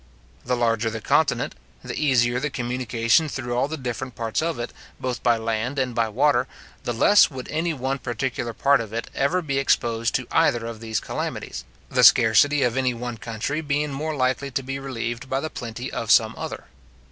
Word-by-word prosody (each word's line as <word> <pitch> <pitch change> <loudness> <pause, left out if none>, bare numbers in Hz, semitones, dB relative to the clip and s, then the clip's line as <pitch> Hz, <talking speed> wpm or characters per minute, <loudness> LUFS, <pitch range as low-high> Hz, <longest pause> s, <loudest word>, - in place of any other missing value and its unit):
The 125 - 0
larger 115 -2 +1
the 110 0 -5
continent, - - +1 0.3
the - - -5
easier 125 -4 +2
the 150 - -1
communication 125 +3 +1
through 120 -4 -4
all 125 +3 +1
the 160 +2 -4
different 130 -1 -5
parts 115 +2 -1
of 165 0 -1
it, 120 - -5 0.3
both 125 -2 -3
by 120 -2 +3
land 115 +4 -2
and 130 -2 0
by 115 -1 +1
water, 130 +2 +2 0.4
the - - 0
less 200 - +5
would 130 -4 -7
any 165 +2 0
one 135 +1 -2
particular 120 0 -3
part 140 +3 +3
of 110 -1 -8
it 115 +1 -4
ever 170 +7 +1
be 140 -3 0
exposed 115 -4 +1
to 130 - 0
either 115 -1 +2
of 115 -1 -6
these 110 -1 -2
calamities, - - -5 0.2
the - - +1
scarcity 145 0 +6
of 125 +1 +1
any 130 -2 +1
one 120 0 -5
country 120 +8 -3
being 150 0 -1
more 155 +3 -3
likely 130 +1 0
to 135 0 -2
be 135 +1 -4
relieved 120 -2 -4
by 135 - 0
the 155 +3 -4
plenty 120 +2 -6
of 115 - -4
some 110 -2 +5
other. - - -6
125 Hz, 195 wpm, -24 LUFS, 115-140 Hz, 0.4 s, scarcity